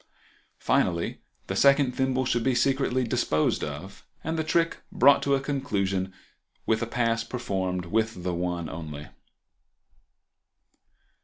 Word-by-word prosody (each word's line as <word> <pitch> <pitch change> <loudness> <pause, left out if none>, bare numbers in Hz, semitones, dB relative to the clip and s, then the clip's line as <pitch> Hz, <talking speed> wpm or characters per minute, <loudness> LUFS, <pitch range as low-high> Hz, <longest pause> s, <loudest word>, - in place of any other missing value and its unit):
Finally 85 -1 0 0.2
the 95 - -4
second 140 +3 +5
thimble 130 0 0
should 120 -1 0
be 130 0 +2
secretly 130 0 +1
disposed 115 -11 +1
of, 75 +7 -7 0.2
and 160 +1 -2
the 160 - 0
trick 165 +1 +1
brought 140 - +5
to 140 0 +2
a - - +1
conclusion 100 -10 -1 0.5
with 110 -1 +1
a 115 - -1
pass 115 -1 0
performed 95 -7 -3
with 110 0 -1
the 90 -1 -1
one 85 -1 -2
only. 75 -2 -7
115 Hz, 130 wpm, -27 LUFS, 90-130 Hz, 0.5 s, second